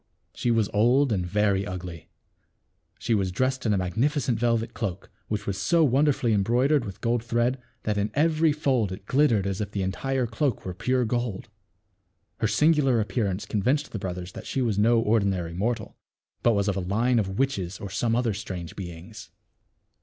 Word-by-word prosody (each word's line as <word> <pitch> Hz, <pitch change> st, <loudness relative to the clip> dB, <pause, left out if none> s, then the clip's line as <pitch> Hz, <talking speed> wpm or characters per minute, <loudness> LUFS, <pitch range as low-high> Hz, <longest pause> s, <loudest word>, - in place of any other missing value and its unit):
She 120 Hz, -, -2 dB
was 115 Hz, -3 st, +2 dB
old 120 Hz, +6 st, +3 dB
and 95 Hz, -4 st, 0 dB
very 100 Hz, +1 st, +1 dB
ugly. 90 Hz, -3 st, -7 dB, 0.9 s
She 115 Hz, -, -1 dB
was 95 Hz, -3 st, +1 dB
dressed 130 Hz, +4 st, 0 dB
in 105 Hz, -, +3 dB
a -, -, +1 dB
magnificent 120 Hz, -, 0 dB
velvet 115 Hz, -1 st, 0 dB
cloak, 100 Hz, -5 st, -5 dB, 0.2 s
which 105 Hz, -2 st, -3 dB
was 100 Hz, 0 st, -3 dB
so 165 Hz, -, +3 dB
wonderfully 135 Hz, -3 st, +2 dB
embroidered 120 Hz, +7 st, +2 dB
with 100 Hz, -2 st, -8 dB
gold 115 Hz, 0 st, 0 dB
thread 120 Hz, +2 st, 0 dB, 0.2 s
that 105 Hz, -1 st, 0 dB
in 100 Hz, +2 st, 0 dB
every 160 Hz, +1 st, +3 dB
fold 135 Hz, -, 0 dB
it 95 Hz, +1 st, -8 dB
glittered 120 Hz, -6 st, +3 dB
as 100 Hz, +1 st, -2 dB
if 105 Hz, -, -3 dB
the 100 Hz, -2 st, -2 dB
entire 130 Hz, +7 st, -1 dB
cloak 120 Hz, +2 st, -1 dB
were 90 Hz, -, -4 dB
pure 125 Hz, +6 st, 0 dB
gold. 120 Hz, -2 st, -2 dB, 0.9 s
Her 115 Hz, -, +1 dB
singular 135 Hz, +1 st, +3 dB
appearance 100 Hz, -2 st, -1 dB
con 105 Hz, -, -2 dB
vinced 140 Hz, +7 st, +1 dB
the 110 Hz, -, -5 dB
brothers 90 Hz, -1 st, -5 dB
that -, -, -9 dB
she -, -, -2 dB
was 115 Hz, -6 st, +1 dB
no 115 Hz, +2 st, +4 dB
ordinary 100 Hz, -6 st, +1 dB
mortal; 110 Hz, +4 st, -2 dB, 0.5 s
but 120 Hz, -, +4 dB
was 100 Hz, 0 st, +1 dB
of 100 Hz, -, +1 dB
a -, -, -1 dB
line 115 Hz, +7 st, +1 dB
of 95 Hz, -2 st, -2 dB
witches 100 Hz, -10 st, -1 dB
or 100 Hz, -, -7 dB
some 115 Hz, +3 st, 0 dB
other 120 Hz, -3 st, +1 dB
strange 95 Hz, -5 st, -6 dB
beings. 90 Hz, +1 st, -9 dB
110 Hz, 185 wpm, -26 LUFS, 95-125 Hz, 0.9 s, no